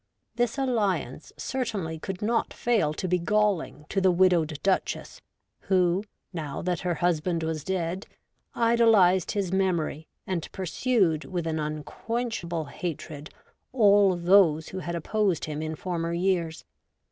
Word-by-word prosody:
This 240 Hz, +1 st, 0 dB
alliance 205 Hz, -, -1 dB
certainly 200 Hz, -11 st, -3 dB
could 190 Hz, +4 st, -5 dB
not 230 Hz, +1 st, 0 dB
fail 220 Hz, -11 st, +1 dB
to 170 Hz, +4 st, -4 dB
be 180 Hz, 0 st, +2 dB
galling 200 Hz, -5 st, 0 dB
to 195 Hz, -, 0 dB
the 190 Hz, -, +5 dB
widowed 175 Hz, -4 st, +3 dB
Duchess, 190 Hz, -1 st, -1 dB, 0.4 s
who, 185 Hz, 0 st, +2 dB, 0.3 s
now 155 Hz, -5 st, -4 dB
that 180 Hz, -1 st, -1 dB
her 180 Hz, -2 st, -1 dB
husband 170 Hz, 0 st, 0 dB
was 160 Hz, -2 st, -2 dB
dead, 185 Hz, 0 st, -2 dB, 0.5 s
idolised 225 Hz, -6 st, +4 dB
his 200 Hz, -4 st, -1 dB
memory 170 Hz, -5 st, 0 dB, 0.2 s
and 180 Hz, -4 st, -3 dB
pursued 190 Hz, -3 st, +1 dB
with 175 Hz, -3 st, -3 dB
an 160 Hz, -1 st, -1 dB
un 150 Hz, 0 st, -3 dB
quenchable 175 Hz, -, -3 dB
hatred 155 Hz, -3 st, -6 dB, 0.4 s
all 205 Hz, -5 st, +5 dB
those 175 Hz, -3 st, +4 dB
who 185 Hz, -, -5 dB
had 170 Hz, -1 st, -4 dB
opposed 190 Hz, +1 st, 0 dB
him 150 Hz, -1 st, -4 dB
in 155 Hz, 0 st, -3 dB
former 170 Hz, 0 st, -3 dB
years. 170 Hz, -2 st, -1 dB
180 Hz, 135 wpm, -27 LUFS, 160-200 Hz, 0.5 s, the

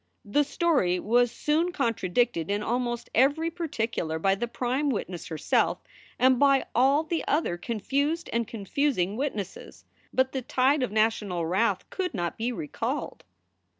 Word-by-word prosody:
The 210 Hz, +9 st, +2 dB
story 280 Hz, -, +1 dB
was 240 Hz, +4 st, +2 dB
soon 320 Hz, +7 st, 0 dB
contradicted 230 Hz, -, 0 dB
in 205 Hz, +1 st, 0 dB
almost 240 Hz, 0 st, -2 dB
every 290 Hz, +7 st, +3 dB
particular 230 Hz, -, -2 dB
by 195 Hz, +4 st, +2 dB
the 240 Hz, +5 st, -2 dB
prime 255 Hz, +4 st, -1 dB
witness 185 Hz, -8 st, -3 dB
herself 160 Hz, -2 st, +1 dB, 0.4 s
and 255 Hz, 0 st, +4 dB
by 275 Hz, -2 st, +4 dB
all 270 Hz, +5 st, +4 dB
the 325 Hz, +1 st, -2 dB
other 295 Hz, -, +1 dB
confused 280 Hz, -, -1 dB
and 235 Hz, -1 st, 0 dB
confusing 210 Hz, -2 st, -1 dB
witnesses. 215 Hz, -8 st, -5 dB, 0.3 s
But 260 Hz, 0 st, +2 dB
the 265 Hz, -, -3 dB
tide 265 Hz, +4 st, +2 dB
of 250 Hz, -, -1 dB
national 210 Hz, -5 st, +1 dB
wrath 190 Hz, +8 st, +1 dB
could 365 Hz, -, -3 dB
not 175 Hz, -3 st, -2 dB
be 235 Hz, +3 st, -2 dB
recalled. 155 Hz, -11 st, -4 dB
240 Hz, 145 wpm, -27 LUFS, 200-285 Hz, 0.4 s, and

